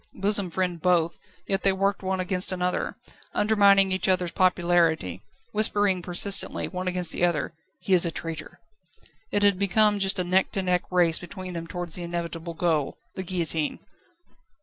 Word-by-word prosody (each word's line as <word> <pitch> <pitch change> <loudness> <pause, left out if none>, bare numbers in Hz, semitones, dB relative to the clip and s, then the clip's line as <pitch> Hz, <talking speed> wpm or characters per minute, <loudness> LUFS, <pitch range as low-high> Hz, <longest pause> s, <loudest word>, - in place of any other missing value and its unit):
Bosom 200 -1 +3
friend 180 -1 -2
both, 170 -2 +1 0.3
yet 195 -1 0
they 195 - +3
worked 195 +1 -1
against 185 -1 -1
one 185 - -4
another, 180 0 -2 0.4
undermining 200 -2 +4
each 185 +2 0
other's 180 -2 +1
popularity, 170 - +1 0.3
whispering 205 -3 +1
persistently, 185 +3 0
one 185 -1 -5
against 180 -2 +2
the - - -2
other: 170 -3 0 0.3
"He 190 - 0
is 180 - +6
a 170 - +5
traitor!" 165 -1 -6 0.7
It 205 - 0
had 200 -2 +3
become 205 +1 +3
just 195 0 +2
a 180 - 0
neck 185 +2 +1
to 195 - -1
neck 180 -1 0
race 175 -3 +3
between 185 +1 -8
them 165 -1 -6
towards 175 -1 -5
the 180 - -4
inevitable 170 -1 -5
goal 160 -4 0 0.2
the - - -5
guillotine. 170 -4 -2
180 Hz, 165 wpm, -25 LUFS, 170-195 Hz, 0.7 s, is